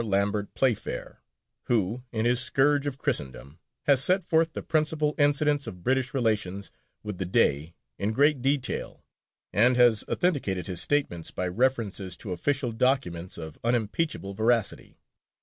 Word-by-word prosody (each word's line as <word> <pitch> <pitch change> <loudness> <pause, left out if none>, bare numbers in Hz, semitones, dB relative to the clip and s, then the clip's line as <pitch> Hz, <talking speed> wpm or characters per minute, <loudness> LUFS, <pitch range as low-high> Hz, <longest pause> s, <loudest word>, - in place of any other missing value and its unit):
Lambert 100 0 0
Playfair, 120 - -2 0.4
who 115 +1 0
in 110 -1 -1
his 120 0 +3
Scourge 140 +3 +2
of 140 -2 -4
Christendom, 75 - -3 0.2
has 135 -2 +4
set 185 +4 +3
forth 160 0 +1
the - - -5
principal 155 -1 +1
incidents 145 0 +2
of 90 -1 -9
British 130 0 +1
relations 105 -6 -1 0.3
with 105 -3 -6
the 95 - -1
Dey 80 -2 +1 0.2
in 100 +2 0
great 140 +3 +3
detail, 135 0 -2 0.5
and 120 +6 +4
has 120 -4 +5
authenticated 115 - 0
his 90 -3 0
statements 140 - 0
by 90 - -3
references 105 -3 -1
to 100 - -7
official 125 +7 -1
documents 110 -8 -1
of 80 -2 -8
unimpeachable 115 -1 -1
veracity. 110 +1 0
120 Hz, 140 wpm, -27 LUFS, 95-140 Hz, 0.5 s, has